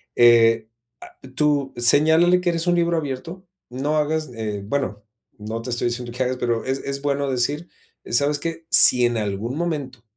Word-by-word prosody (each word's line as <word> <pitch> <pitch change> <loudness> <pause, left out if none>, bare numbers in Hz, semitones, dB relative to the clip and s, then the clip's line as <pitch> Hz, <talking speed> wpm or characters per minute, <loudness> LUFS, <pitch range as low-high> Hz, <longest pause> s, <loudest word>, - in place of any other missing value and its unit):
eh, 115 -2 +4 0.4
ah - - -29 0.2
tú 145 -2 0
señálale 160 +8 +4
que 180 - 0
eres 165 0 -1
un 175 - +3
libro 170 -1 +1
abierto, 160 +5 -6 0.2
no 140 +5 -2
hagas, 155 -1 -1
eh, 105 -3 -5
bueno, 105 -4 -3 0.3
no 110 +2 -6
te 115 - -7
estoy 120 0 -1
diciendo 120 0 -5
que 125 +2 -2
hagas, 130 0 -2
pero 120 -2 -2
es 135 +1 -2
es 140 0 -5
bueno 140 -1 -1
decir: 145 +7 -2 0.4
"¿Sabes 145 +4 +1
qué? 165 +1 -6
Si 125 -1 +6
en 120 -1 0
algún 105 +4 -3
momento, 145 -8 -4
135 Hz, 175 wpm, -21 LUFS, 120-155 Hz, 0.4 s, Si